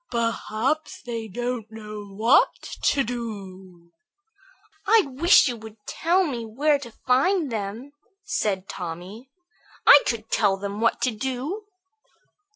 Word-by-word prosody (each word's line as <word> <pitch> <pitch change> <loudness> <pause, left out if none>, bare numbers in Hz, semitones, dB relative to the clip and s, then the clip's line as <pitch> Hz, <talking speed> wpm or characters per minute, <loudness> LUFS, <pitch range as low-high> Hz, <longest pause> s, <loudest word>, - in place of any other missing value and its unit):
"Perhaps 235 +4 -2
they 230 -3 -5
don't 240 +1 -4
know 215 -1 -8
what 215 +6 +3 0.3
to 275 - +3
do." 190 -7 -7 1.0
"I 445 +2 +6
wish 285 +4 +5
you 245 - -2
would 220 0 -11
tell 355 +4 +1
me 245 -7 -3
where 285 +7 +1
to 240 -4 -9
find 290 +4 +2
them," 220 +5 -5 0.3
said 200 -10 -1
Tommy. 185 +8 -7 0.6
"I 285 - +10
could 225 -2 -3
tell 200 -3 +2
them 200 +2 -5
what 230 - +2
to 255 - +2
do." 265 - -4
230 Hz, 125 wpm, -24 LUFS, 210-265 Hz, 1.0 s, I